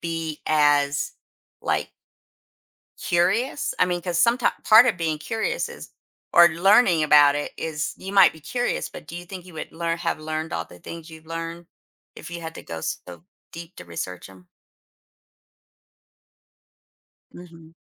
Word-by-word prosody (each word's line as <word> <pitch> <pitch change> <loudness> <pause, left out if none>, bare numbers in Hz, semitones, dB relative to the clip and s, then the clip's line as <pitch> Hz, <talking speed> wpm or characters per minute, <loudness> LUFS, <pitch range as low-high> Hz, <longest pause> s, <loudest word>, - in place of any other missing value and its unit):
be 165 -2 -4
as, 145 -2 +2 0.5
like - - -1 1.1
curious? 195 +12 0
I - - +5
mean, 175 -1 -2
'cause 175 -1 -2
someti 235 +6 +3
part 220 +3 +8
of 235 -6 +2
being 160 -2 -1
curious 225 - -2
is - - -11 0.4
or 170 0 +8
learning 180 0 +4
about 145 -1 +6
it 145 - -3
is 150 -2 -3
you 190 - -7
might 195 -2 +7
be 160 - -14
curious, 245 - -2
but 170 - -11
do 165 - -8
you 175 - -9
think 180 0 -9
you 180 - -13
would 160 - -7
learn 165 0 -2
have 170 -2 -2
learned 155 +1 -4
all - - -3
the 90 - -16
things 165 - -9
you've 160 0 -13
learned, 165 +1 -6 0.5
if - - -10
you 170 - -5
had 160 0 -7
to - - -9
go 80 - -7
so 85 +1 -6 0.3
deep 170 +1 -10
to - - -11
research 90 +2 -6
'em? 95 -2 -17 2.9
Mhm. 165 -2 -14
165 Hz, 160 wpm, -24 LUFS, 155-180 Hz, 2.9 s, part